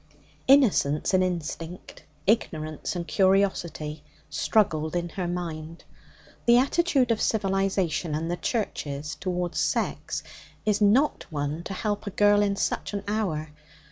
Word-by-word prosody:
Innocence 210 - +4
and 185 0 +4
instinct, 170 0 -5 0.2
ignorance 155 -8 0
and 170 -1 -4
curiosity, 175 -5 +1 0.3
struggled 160 -1 +1
in 175 0 -1
her 180 +1 -3
mind. 165 -2 -5 0.6
The 235 0 +7
attitude 275 -2 +2
of 225 - 0
civilization 195 -6 0
and 165 +2 -2
the 175 - -1
Churches 150 - -3
towards 180 -2 -2
sex - - -1 0.4
is 210 0 +1
not 240 +9 +3
one 145 +1 -3
to 195 - -4
help 205 +1 -2
a - - 0
girl 205 +1 +4
in 200 -1 +1
such 200 - -2
an 200 - -3
hour. 185 -8 -1
185 Hz, 130 wpm, -26 LUFS, 160-205 Hz, 0.6 s, The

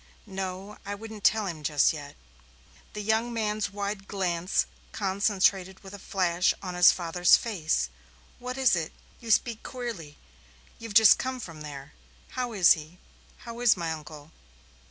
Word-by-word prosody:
"No, 190 0 -6
I 205 0 -4
won't 220 0 -10
tell 215 0 +3
him 170 -5 -5
just 150 0 +3
yet." 145 -2 -9 0.8
The 210 - -5
young 220 +3 +1
man's 215 -2 -1
wide 200 0 -4
glance 180 -2 0 0.3
concentrated 195 -1 +1
with 195 0 -11
a 205 - -8
flash 180 -2 +1
on 185 -2 -6
his 180 0 +7
father's 175 0 +4
face. 160 - -1 0.5
"What 250 +1 -5
is 260 -6 +4
it? 165 -2 -3 0.3
You 230 - -10
speak 225 0 +2
queerly. 230 - -7 0.6
You've 230 -3 -8
just 220 -2 +8
come 260 0 -3
from 165 -9 -9
there. 145 -1 -9 0.4
How 250 -2 -3
is 190 -5 +6
he 160 +2 -10 0.5
how 235 0 -7
is 240 -5 +4
my 165 -2 -2
uncle?" 155 -1 -9
195 Hz, 155 wpm, -27 LUFS, 170-220 Hz, 0.8 s, just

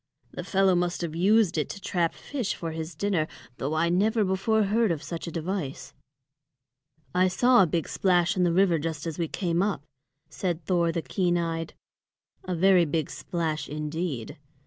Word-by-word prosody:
The - - -6
fellow 195 -1 +3
must 175 0 0
have 165 -2 -4
used 195 0 +3
it 150 - -2
to - - -6
trap 175 -3 -1
fish 255 -8 -3
for 165 -1 -5
his 160 +1 -6
dinner, 190 -6 0 0.3
though 145 +4 -2
I 165 +2 +2
never 215 +5 +2
before 200 +3 +1
heard 215 +2 +2
of 160 -2 -3
such 170 0 -6
a - - -4
device." 165 -3 -4 1.2
"I 185 +1 +4
saw 245 +5 +4
a 185 - +4
big 165 +1 -1
splash 175 -3 +2
in 185 - 0
the 175 -1 +3
river 175 -2 +3
just 155 0 -4
as 165 -1 -4
we 165 - 0
came 170 0 -1
up," 200 -6 -1 0.4
said 175 -4 -3
Thor 170 -1 +2
the 165 0 -3
keen 175 -2 0
eyed, 165 -1 -3 0.7
"a 185 - -2
very 185 0 +5
big 155 -1 -2
splash 155 +2 -3
indeed. 150 -4 -4
175 Hz, 180 wpm, -27 LUFS, 165-190 Hz, 1.2 s, very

